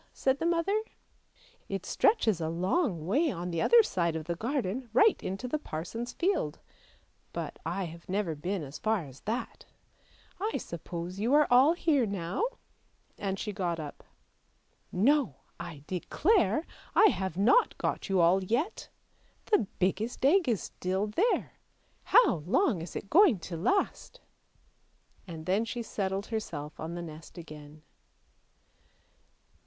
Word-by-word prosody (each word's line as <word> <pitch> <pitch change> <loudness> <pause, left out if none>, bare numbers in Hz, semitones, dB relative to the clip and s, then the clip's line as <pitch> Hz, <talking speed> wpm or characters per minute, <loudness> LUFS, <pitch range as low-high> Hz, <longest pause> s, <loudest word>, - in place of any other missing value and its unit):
" - - -36
said 265 +1 +3
the 330 - 0
mother. 345 +5 +1 0.5
" - - -31
It 195 0 -5
stretches 220 - +2
a 160 - -1
long 180 - 0
way 285 - +2
on 180 -5 -4
the 170 - -1
other 470 -1 +7
side 170 - 0
of 160 -1 -4
the 170 - -1
garden, 240 - -2
right 420 - +5
into 195 +7 -4
the 305 +5 -1
parson's 230 - -5
field; 340 - 0 0.8
but - - -5
I 185 +4 -2
have 170 0 -9
never 190 -3 0
been 175 +4 -3
as 140 +1 -8
far 215 -6 0
as 135 -1 -13
that! 230 +4 -4 0.7
I 430 +3 -1
suppose 170 +2 -6
you 235 +7 +2
are 300 0 +6
all 260 +6 +7
here 295 -8 +2
now? 190 - -3 0.4
" - - -39
and 195 -1 -2
she 210 +1 -4
got 175 -4 -2
up. 150 -2 -8 0.5
" - - -41 0.2
No! 280 - +2 0.2
I 170 -5 -8
declare 230 - +1 0.3
I 435 - +7
have 190 - -3
not 245 - +4
got - - -2
you 190 -2 +3
all 180 +3 +4
yet! 245 - -2 0.6
The 415 - +4
biggest 210 +7 0
egg 330 0 +4
is 220 -5 0
still 190 +3 -2
there; 350 - 0 0.5
how 475 - +5
long 225 - +2
is 165 - -8
it 200 - -6
going 350 - +6
to 170 - -6
last? 390 - -1 0.5
" - - -37
and 160 -3 -8
then 195 +4 +2
she 235 +1 -4
settled 195 -2 -2
herself 155 -10 -5
on 165 +2 -5
the 175 - -5
nest 160 +1 -10
again. 150 -2 -11
195 Hz, 155 wpm, -30 LUFS, 170-275 Hz, 0.8 s, other